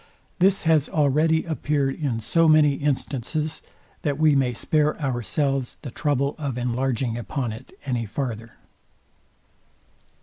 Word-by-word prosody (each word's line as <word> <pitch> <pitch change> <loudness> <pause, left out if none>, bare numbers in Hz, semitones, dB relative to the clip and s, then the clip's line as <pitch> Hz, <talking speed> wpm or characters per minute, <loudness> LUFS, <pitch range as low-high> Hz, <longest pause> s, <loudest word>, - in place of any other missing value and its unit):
This 195 +2 +3
has 160 -3 +3
already 155 +2 +2
appeared 150 -4 -1
in 130 -7 -2
so 165 +9 +3
many 155 -2 +5
instances, 150 +2 -2 0.4
that 145 -2 -1
we 155 -1 +4
may 130 -2 +2
spare 150 +6 0
ourselves 135 - -1
the 135 - -6
trouble 140 +1 0
of 140 -5 -3
enlarging 125 -1 -1
upon 120 -1 -3
it 120 +4 -12
any 120 -4 -2
farther. 115 -1 -4
140 Hz, 125 wpm, -24 LUFS, 125-155 Hz, 0.4 s, many